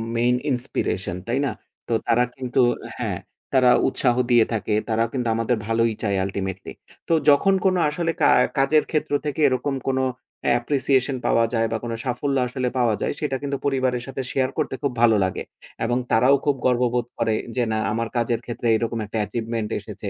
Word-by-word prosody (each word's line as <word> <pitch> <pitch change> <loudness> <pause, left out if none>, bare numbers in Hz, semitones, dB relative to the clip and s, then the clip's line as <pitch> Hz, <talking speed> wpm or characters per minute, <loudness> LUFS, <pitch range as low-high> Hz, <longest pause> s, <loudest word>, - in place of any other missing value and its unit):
main 120 +1 +3 0.2
inspiration 95 -8 -1
তাই 125 +4 0
না? 130 - -1 0.4
তো 115 - -1
তারা 120 +1 +4
কিন্তু 130 0 -2 0.4
হ্যাঁ, - - -2 0.4
তারা 130 -2 +5 0.2
উৎসাহ 125 -2 +1 0.2
দিয়ে 120 -2 +6
থাকে। 105 -1 -1 0.2
তারাও 115 +1 +1
কিন্তু 125 -3 -1
আমাদের 115 +2 +1
ভালোই 115 0 +2
চায় 100 -2 +1
ultimately। 95 -1 -4 0.4
তো - - +2 0.2
যখন 150 +7 +5
কোন 185 -1 +4
আসলে 165 +2 -1
কা - - +5 0.3
কাজের 150 +3 +4
ক্ষেত্র 155 -3 -1
থেকে 150 +1 -3
এরকম 135 +1 -1
কোন 135 -1 +1 0.6
appreciation 135 +1 +1
পাওয়া 115 - +3
যায় 115 0 +2
বা 115 - 0
কোন 120 - -4
সাফল্য 135 +2 -1
আসলে 125 0 -2
পাওয়া 120 -4 +2
যায়, - - 0
সেটা 150 -3 -1
কিন্তু 140 -1 -2
পরিবারের 130 -3 0
সাথে 135 0 -4
শেয়ার 130 -1 +1
করতে - - -1
খুব 140 - +1
ভালো 115 -2 +6
লাগে। 95 -1 -2 0.4
এবং 120 +1 +1
তারাও 125 +5 +5
খুব 145 -2 +2
গর্ববোধ 125 -1 +2
করে 115 -1 +1 0.2
যে 125 - +1
না, 110 - 0
আমার 115 +2 -1
কাজের 115 -1 0
ক্ষেত্রে 120 0 -4
এরকম 115 0 -2
একটা 105 +2 -5
achievement 115 +1 -3
এসেছে। - - -7
125 Hz, 180 wpm, -23 LUFS, 115-135 Hz, 0.6 s, দিয়ে